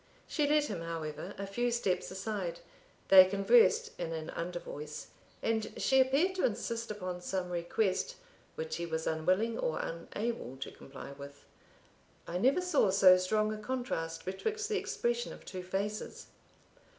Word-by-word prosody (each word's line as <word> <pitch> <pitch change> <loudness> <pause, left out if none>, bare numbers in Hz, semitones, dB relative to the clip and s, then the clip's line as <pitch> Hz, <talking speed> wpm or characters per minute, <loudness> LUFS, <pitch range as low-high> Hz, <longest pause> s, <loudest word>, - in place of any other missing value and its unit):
She 295 -3 +1
led 300 0 +4
him, 180 - -4
however, 165 +2 -5
a 200 - -4
few 240 +5 0
steps 230 -6 0
aside; 190 -3 -4 0.5
they 190 -1 +11
conversed 450 - +4
in 165 - -3
an 160 -1 -5
under 175 +1 -4
voice, 150 -2 -7 0.3
and 220 -1 0
she 265 0 +4
appeared 275 +9 +3
to - - 0
insist 230 +1 -1
upon 185 -4 -4
some 180 0 -3
request 185 - 0 0.4
which 475 0 -3
he 170 - -3
was 160 0 -2
unwilling 185 +9 +1
or 155 - 0
unable 170 - -4
to 130 - -6
comply 140 0 -10
with. 140 0 -11 0.8
I 175 +1 -3
never 270 - +4
saw 345 - +3
so 190 -1 +7
strong 215 +4 +1
a 215 - -6
contrast 210 -9 -3
betwixt 430 - -2
the 425 - +1
expression 240 0 -1
of - - -13
two 185 -2 -6
faces. 195 +3 -3
195 Hz, 155 wpm, -32 LUFS, 170-240 Hz, 0.8 s, they